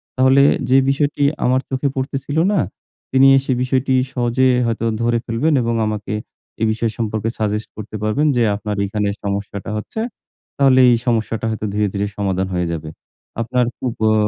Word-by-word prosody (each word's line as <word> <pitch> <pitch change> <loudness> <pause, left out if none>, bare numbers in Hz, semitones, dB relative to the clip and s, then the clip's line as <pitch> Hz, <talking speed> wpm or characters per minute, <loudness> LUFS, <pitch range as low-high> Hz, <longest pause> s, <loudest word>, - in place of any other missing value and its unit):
তাহলে 130 +1 +5 0.3
যে 130 - +6
বিষয়টি 145 +1 0 0.2
আমার 130 +1 +2
চোখে 135 +1 0
পড়তেছিল 135 +2 -3 0.2
না 200 - +2 0.5
তিনি 135 +1 +6 0.2
সেই 130 -2 0
বিষয়টি 130 +1 0 0.2
সহজে 125 +1 +2 0.2
হয়তো 115 0 -1 0.2
ধরে 120 0 +2
ফেলবেন 125 +8 0
এবং 115 0 0
আমাকে 105 -1 -3 0.5
এই - - +3
বিষয় 110 0 -1
সম্পর্কে 110 -1 -2
সাজেস্ট 105 0 -1
করতে 110 0 -8
পারবেন 125 +8 +1
যে 120 - +3
আপনার 105 0 -4
এখানে 105 0 -1
সমস্যাটা 100 0 -4
হচ্ছে। 105 - -6 0.6
তাহলে 135 -2 +5
এই 120 - +4
সমস্যাটা 115 -1 0
হয়তো 110 -1 -3
ধীরে, 105 0 +1
ধীরে 100 +1 -1
সমাধান 95 -2 -1
হয়ে 90 -1 0
যাবে। 80 -1 -5 0.5
আপনার 125 +2 +1 0.2
উপ 120 - -8
আ - - +3
115 Hz, 165 wpm, -19 LUFS, 105-130 Hz, 0.6 s, যে